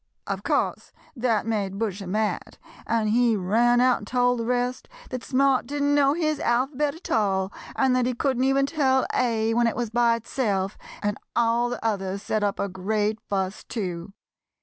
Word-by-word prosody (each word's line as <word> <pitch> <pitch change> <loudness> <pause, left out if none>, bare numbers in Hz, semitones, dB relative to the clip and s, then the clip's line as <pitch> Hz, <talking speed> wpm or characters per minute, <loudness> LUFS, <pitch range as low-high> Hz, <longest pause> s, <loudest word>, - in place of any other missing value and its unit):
] - - -52
"Of - - -3
course - - -1 0.2
that 230 -4 0
made 200 -4 -2
Bushy 200 -3 -3
mad, 210 +3 -2 0.3
and 225 -2 +1
he 235 0 +3
ran 230 +6 +3
out 250 0 +4
and 205 - -10
told 245 0 +2
the 230 - -2
rest 250 - -1 0.2
that 255 -2 -4
Smart 270 -2 +2
didn't 285 +1 0
know 280 -1 +4
his 310 -2 0
alphabet 270 +5 0
at 330 - -9
all, 195 -3 +1 0.2
and 265 -2 +2
that 250 -1 +2
he 250 - -1
couldn't 260 0 0
even 270 +1 +3
tell 270 -3 +2
A 225 -2 +1
when 235 0 +3
it 230 - -1
was 235 -2 -3
by 235 0 +3
itself, 210 -4 -2 0.3
and 205 0 -1 0.2
all 235 +1 +2
the 245 -1 -5
others 195 -2 -2
set 215 0 -1
up 200 -1 -1
a 200 - 0
great 210 +3 -1
fuss, 195 0 -2
too. 180 -5 -5
235 Hz, 185 wpm, -25 LUFS, 205-255 Hz, 0.3 s, out